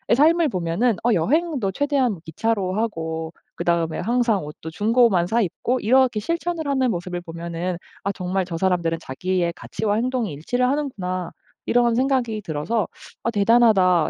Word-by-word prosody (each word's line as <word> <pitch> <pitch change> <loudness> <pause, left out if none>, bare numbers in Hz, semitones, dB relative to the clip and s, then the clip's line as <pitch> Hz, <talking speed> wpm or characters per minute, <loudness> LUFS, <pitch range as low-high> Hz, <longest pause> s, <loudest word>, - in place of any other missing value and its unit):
삶을 325 +4 +4
보면은 185 +4 0
어 240 0 +3
여행도 265 - +1
최대한 265 - 0
기차로 190 +3 -1
하고 165 -7 -3 0.2
그다음에 170 -2 0
항상 230 -3 +1
옷도 150 +2 -8
중고만 210 -2 +3
사입고 230 +4 0
이렇게 250 0 +3
실천을 335 +5 -2
하는 260 -3 +2
모습을 175 0 -4
보면은 170 +1 -4 0.3
'아 200 - 0
정말 185 0 -2
저 170 -2 -5
사람들은 170 -2 +1
자기의 170 +4 -1
가치와 210 -2 -2
행동이 240 - -1
일치를 245 - 0
하는구나.' 190 - -2 0.4
이런 240 -1 +3
생각이 250 -4 +1
들어서 165 +9 -1 0.4
'아 230 - +1
대단하다.' 200 -6 +4
205 Hz, 350 characters per minute, -23 LUFS, 175-245 Hz, 0.4 s, 삶을